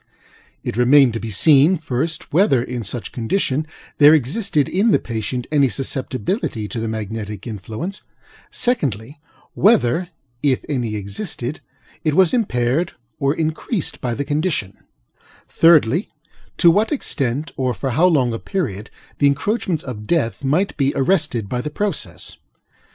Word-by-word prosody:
It - - -4
remained 130 0 +5
to 115 - -3
be 115 - -5
seen, 150 - +5
first, 155 +1 -3
whether, 150 - +4
in 125 -2 -5
such 110 +3 -3
condition, 140 - -1 0.3
there 150 +1 +8
existed 150 - 0
in 200 +6 +2
the - - +5
patient 120 +2 -4
any 140 -3 +4
susceptibility 130 - -3
to 120 - -4
the 115 - -2
magnetic 105 -2 -5
influence; 110 - -6 0.5
secondly, 140 - -1 0.3
whether, 180 - +3 0.3
if 140 -3 +1
any 120 -7 -2
existed, 120 - -5 0.4
it 155 -2 +1
was 185 -2 +4
impaired 145 - 0 0.3
or 140 +2 +1
increased 160 +4 -2
by 120 -2 -2
the 140 - -3
condition; 145 - -1 0.7
thirdly, 165 - +4 0.5
to 170 - +6
what 210 - +1
extent, 145 - -1
or 130 -1 0
for 135 +2 -3
how 160 +9 +4
long 130 -9 +2
a 115 - -4
period, 110 - -3 0.3
the 145 - +5
encroachments 165 +3 0
of 105 -5 -7
Death 145 -7 0
might 160 +9 +1
be 140 -1 +2
arrested 135 - +1
by 125 +3 -2
the 150 - -4
process. 150 - -4
140 Hz, 140 wpm, -20 LUFS, 120-165 Hz, 0.7 s, there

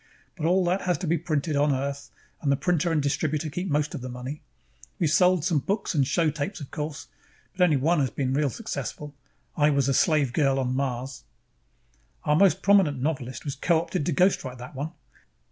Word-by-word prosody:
But 160 -3 -2
all 180 +1 +3
that 180 +3 +1
has 180 -3 0
to 185 - -5
be 165 0 +1
printed 155 -2 -1
on 145 +1 +3
Earth, 140 +1 -3 0.3
and 140 - +1
the - - +4
printer 175 +2 0
and 155 -3 +1
distributor 155 +2 -1
keep 180 +5 -3
most 150 +1 0
of 150 - -5
the 130 - -6
money. 125 +4 -6 0.6
We've 165 - +1
sold 180 -1 +4
some 170 -5 +2
books 200 +8 -2
and 140 -5 +2
show 160 +2 +2
tapes, 150 +8 -4
of 145 - -9
course, 150 -1 -5 0.5
but 180 - +2
only 160 -5 +4
one 155 +5 +2
has 135 -2 +1
been 130 +3 -2
really 145 0 +2
successful 145 - -6 0.4
I 150 -1 +4
Was 140 -2 +2
a 135 - +2
Slave 145 -3 +2
Girl 135 -2 +2
on 130 -1 -1
Mars. 130 -1 -3 1.0
"Our 150 - +2
most 195 +3 +4
prominent 190 -9 +4
novelist 130 -3 -3
was 140 - -2
co 160 +5 +2
opted 165 -2 -3
to - - +1
ghostwrite 140 -6 +1
that 125 +3 -9
one. 145 +4 -4
150 Hz, 205 wpm, -26 LUFS, 135-170 Hz, 1.0 s, the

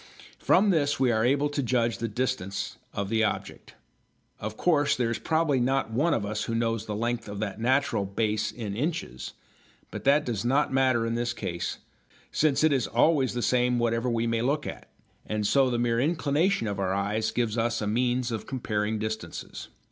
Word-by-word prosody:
From 200 +2 +4
this 145 -6 +1
we 130 -2 +3
are 110 -1 +1
able 140 +4 +2
to 145 0 -1
judge 120 -4 0
the 115 - -1
distance 105 -4 -3
of 100 -1 -3
the 110 0 +2
object. 110 - -3 0.6
Of 110 +1 -5
course 150 -5 +3
there 120 -2 0
is 115 - -2
probably 160 -4 +1
not 130 -1 0
one 150 +9 +2
of 105 - -2
us 105 +1 -2
who 115 - -2
knows 115 -1 -1
the 105 - -3
length 120 0 -2
of 100 - -6
that 105 0 -4
natural 130 -4 +2
"base" 105 +1 -1
in 105 -3 -5
inches, 145 - -3 0.6
but - - -6
that 145 +2 +4
does 115 -4 -2
not 135 +3 +1
matter 130 -3 +3
in 115 - -1
this 120 +1 -1
case, 85 -6 -4 0.5
since 155 -1 +2
it 155 -2 +5
is 130 -4 +1
always 130 +1 +2
the 120 - -1
same 125 -1 +2
whatever 115 +1 0
we 115 -1 0
may 115 -1 0
look 140 +5 0
at, - - -7 0.4
and 110 -1 -1
so 135 +4 +4
the 120 - 0
mere 120 -1 +1
inclination 155 - +1
of 100 -2 -2
the - - -2
eyes 100 +3 0
gives 115 -3 -1
us 115 0 0
a 105 - -2
means 120 +3 0
of 110 -2 -4
comparing 110 -4 -1
distances. 110 -5 -5
120 Hz, 195 wpm, -27 LUFS, 110-135 Hz, 0.6 s, it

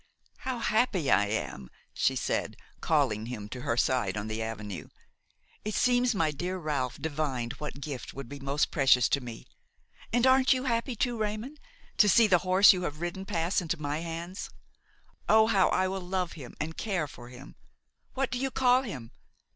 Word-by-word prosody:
"How 260 -1 -4
happy 215 - +1
I 100 +2 +4
am!" 85 - -4 0.2
she - - +1
said, - - -2 0.2
calling 125 -9 +1
him 110 -4 -6
to 125 +2 -7
her 115 - -1
side 120 -6 +1
on 105 - -3
the 110 +1 -3
avenue. 105 -4 -5 0.8
"It 215 0 -3
seems 245 -1 +3
my 160 -5 +2
dear 180 +6 -3
Ralph 145 -7 -2
divined 145 -6 -2
what 150 -2 -6
gift 140 -3 -6
would 135 -2 -8
be 140 +2 -8
most 140 +2 0
precious 130 -4 +4
to 140 - +1
me. 120 -2 -9 0.7
And 240 +2 +3
aren't 260 +1 +5
you 255 0 -2
happy 235 0 -1
too, 240 +1 -1
Raymon, 215 +7 -3 0.4
to 210 - +6
see 230 +4 +6
the 185 -4 +4
horse 185 +3 +6
you 180 - -3
have 150 -3 -4
ridden 175 +3 -4
pass 170 +2 0
into 170 -1 -3
my 145 0 -2
hands? 170 +3 -6 0.8
Oh 220 0 +7
I - - +2
how 195 -3 +4
I 185 0 +2
will 190 0 -3
love 180 -1 -2
him 135 -6 -10
and 160 +2 -4
care 190 -8 -1
for 120 -3 -12
him! 125 +2 -12 0.6
What 270 -1 -1
do 250 - -2
you 270 +1 0
call 255 -1 +3
him? 135 - -7
165 Hz, 185 wpm, -29 LUFS, 130-215 Hz, 0.8 s, Oh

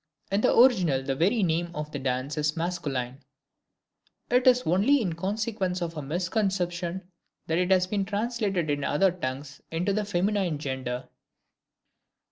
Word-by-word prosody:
In 200 +2 +2
the - - +4
original 185 - +5
the 135 0 -1
very 195 - +2
name 170 0 0
of 150 0 -5
the 145 - -4
dance 130 +2 -2
is 150 +1 -1
masculine; 140 -7 -3 1.1
it 250 +1 +3
is 250 0 +6
only 200 - +4
in 185 -8 -1
consequence 195 +1 -2
of 170 -2 -4
a 150 - -4
misconception 180 +2 -2 0.3
that 160 +1 0
it 180 0 +1
has 185 -1 +4
been 195 +1 -1
translated 205 -5 -1
in 145 0 -1
other 180 +7 +3
tongues 135 -4 -6
into 175 +5 -1
the 215 +1 0
feminine 195 -3 0
gender. 130 -3 -4
175 Hz, 150 wpm, -27 LUFS, 150-200 Hz, 1.1 s, is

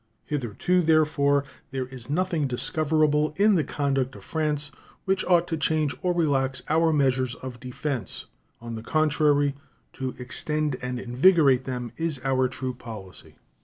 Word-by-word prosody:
Hitherto, 150 - 0
therefore, 150 -3 +3 0.7
nothing 175 +1 0
is 140 - +1
discoverable 150 +3 +2
in 210 +2 +5
the 165 -5 +3
conduct 135 -2 -1
of - - -12
France 150 -2 -1 0.3
which 190 0 +1
ought 175 -1 +3
to 165 - -1
change 155 -2 +1
or 180 - +1
relax 135 -6 +1
our 160 +1 +3
measures 130 -4 +1
of 130 -2 -8
defense. 125 -3 -4 0.3
On 115 0 -7
the 110 - -5
contrary, 145 +1 +2 0.4
to 130 -2 -4
extend 150 +3 -1
and 125 0 -3
invigorate 135 +1 +4
them 125 -3 -4
is 165 -4 -2
our 130 -1 +2
true 130 0 -4
policy. 110 -6 -10
145 Hz, 140 wpm, -26 LUFS, 130-155 Hz, 0.7 s, in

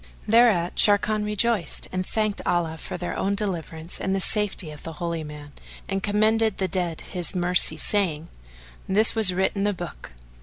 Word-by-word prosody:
Thereat 215 -6 +3
Sharrkan 210 +1 +3
rejoiced 210 -2 -2
and 185 0 -2
all - - -15
thanked 215 -2 -1
Allah 165 -2 -1
for - - -7
their 175 - -5
own 200 +1 -1
deliverance 170 -5 -4
and 190 0 -1
the - - -1
safety 190 -5 0
of 150 - -12
the 165 - -8
Holy 170 0 -4
Man; 150 -1 -10 0.4
and 195 -1 -3
commended 215 +1 +1
the 190 - -1
dead 175 -3 -2
to - - -11
His 180 0 -1
mercy 175 -3 +4
saying, 165 -5 0 0.6
"This 210 +4 +4
was 220 -4 +7
writ 190 +1 0
in 195 - -3
the 205 0 0
Book." 175 - -9
190 Hz, 185 wpm, -24 LUFS, 170-210 Hz, 0.6 s, was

